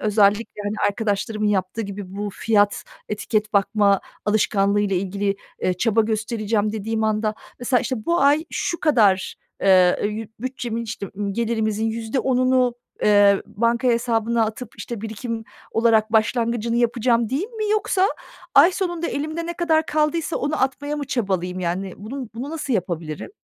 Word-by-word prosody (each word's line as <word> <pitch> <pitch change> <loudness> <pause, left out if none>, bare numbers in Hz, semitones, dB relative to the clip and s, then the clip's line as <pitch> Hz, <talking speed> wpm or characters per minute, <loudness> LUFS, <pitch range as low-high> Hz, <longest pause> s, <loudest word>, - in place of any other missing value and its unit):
özellikle, 210 0 +2
hani, 205 +1 -2
arkadaşlarımın 215 0 -1
yaptığı 200 +1 0
gibi 195 -2 -7
bu 205 0 -3
fiyat, 205 0 +1 0.2
etiket 215 +1 -1
bakma 200 -1 +3 0.2
alışkanlığıyla 205 -1 +2
ilgili, 195 +2 -1 0.3
eee, 180 - +1
çaba 225 +4 +2
göstereceğim 215 -1 0
dediğim 220 +1 -2
anda, 215 0 0 0.2
mesela, 250 0 +2
işte, 240 -5 -3
bu 340 +1 +2
ay 290 +3 +4
şu 340 - -2
kadar, 210 -11 +3 0.3
eee, 195 +3 +3
bütçemin, 240 -2 -3
işte, 220 -2 -5
ımm, 200 -1 -2
gelirimizin 220 -1 -1
%10'unu 250 +2 +1 0.3
eee, 205 -1 +5
banka 235 +3 +1
hesabına 230 -1 +1
atıp, 220 +3 -6
işte, 235 -4 -6
birikim 225 +1 -5 0.3
olarak 225 -1 +3
başlangıcını 230 +1 +1
yapacağım 235 -1 +2
değil 295 - -2
mi? 435 -3 -3
Yoksa 395 -2 +2 0.5
ay 330 +7 +7
sonunda 345 -3 -2
elimde 315 +3 -3
ne 345 - -2
kadar 325 -2 +1
kaldıysa 310 +2 0
onu 290 -1 -1
atmaya 285 +3 -1
mı 290 - -3
çabalayayım? 185 -7 -1
Yani, 180 +2 -2
bunu 250 +4 -6
bunu 255 +5 -5
nasıl 305 -5 -3
yapabilirim? 170 -6 -3
225 Hz, 140 wpm, -22 LUFS, 205-255 Hz, 0.5 s, ay